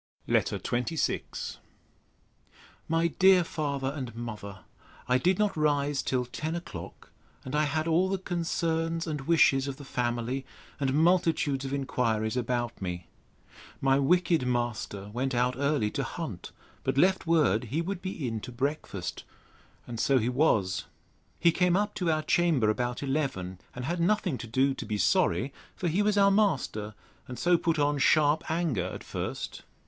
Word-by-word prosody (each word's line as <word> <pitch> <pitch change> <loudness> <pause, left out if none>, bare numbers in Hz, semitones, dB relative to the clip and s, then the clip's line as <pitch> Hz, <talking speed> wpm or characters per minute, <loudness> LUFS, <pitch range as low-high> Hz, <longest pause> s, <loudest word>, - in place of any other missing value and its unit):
LETTER - - +1
XXVI 125 +7 -2 1.3
MY 165 +1 +2
DEAR 185 -1 +7
FATHER 140 -4 -2
AND 125 -5 -5
MOTHER, 105 -5 -7 0.5
I 125 0 +3
did 180 +7 +2
not 210 -1 +1
rise 145 -2 +1
till 125 -1 0
ten 155 +6 -4
o'clock, 170 - -8 0.3
and 130 - -6
I 150 +1 +3
had 155 +2 -1
all 175 +3 +3
the 195 - 0
concerns 165 -2 -1
and 150 -3 -3
wishes 140 -5 +4
of 135 -1 -4
the 145 - -10
family, 120 +1 -2 0.4
and 135 -1 0
multitudes 160 -4 +2
of 135 - -4
inquiries 115 -5 0
about 120 -2 -2
me. 90 -2 -5 0.7
My 135 0 +3
wicked 170 -1 +2
master 120 -5 -2
went 130 +2 -1
out 125 +1 +2
early 140 -6 +1
to 140 - -2
hunt; 135 - -6 0.3
but - - -1
left 185 +3 +3
word 150 - +3
he 135 +8 -2
would 185 +1 -4
be 180 -8 -4
in 115 -1 -2
to 125 - -8
breakfast. 125 - -3 0.6
And 115 -2 -6
so 135 +3 +3
he 120 0 +1
was. 110 -9 +2 0.5
He 170 - +5
came 180 +1 +2
up 205 +1 0
to 180 -4 0
our 155 -1 +1
chamber 155 -13 +3
about 125 +3 -2
eleven, 135 - -2 0.2
and 125 0 -5
had 175 +4 -2
nothing 180 -5 +1
to 120 - -6
do 130 +4 +2
to - - -6
be 105 -1 -1
sorry; 100 +5 +2 0.2
for 180 - -2
he 175 +5 +1
was 210 0 +2
our 200 0 +6
master, 135 - 0 0.3
and 125 - -7
so 175 0 +3
put 165 -1 +1
on 145 -1 +1
sharp 150 +2 +3
anger 160 - 0
at 95 - -6
first. - - -5
140 Hz, 165 wpm, -28 LUFS, 120-165 Hz, 1.3 s, DEAR